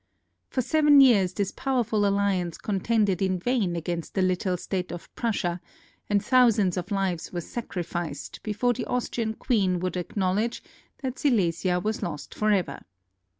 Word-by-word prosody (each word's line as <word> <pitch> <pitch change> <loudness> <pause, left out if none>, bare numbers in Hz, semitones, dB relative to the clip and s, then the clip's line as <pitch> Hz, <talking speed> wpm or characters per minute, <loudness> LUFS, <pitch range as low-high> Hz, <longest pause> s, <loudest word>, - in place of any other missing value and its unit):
For 255 - -1
seven 295 +1 +5
years 215 -9 +6
this 195 0 -2
powerful 235 -6 0
alliance 195 -4 0
contended 205 -1 0
in 190 -1 +1
vain 200 -3 0
against 170 0 -4
the 190 - +2
little 185 0 0
state 180 0 -3
of 175 0 -9
Prussia 180 -7 -1 0.5
and 205 -1 +1
thousands 230 -8 +4
of 180 -1 -4
lives 195 -4 -1
were 175 - -3
sacrificed 175 - -5
before 225 +3 0
the 240 - -4
Austrian 230 -2 -2
queen 195 -8 +1
would 185 +1 -2
acknowledge 190 +5 -1 0.4
that 260 -1 -3
Silesia 180 - +1
was 215 +4 -2
lost 150 -4 -5
forever. 210 -4 +1
195 Hz, 145 wpm, -26 LUFS, 180-230 Hz, 0.5 s, years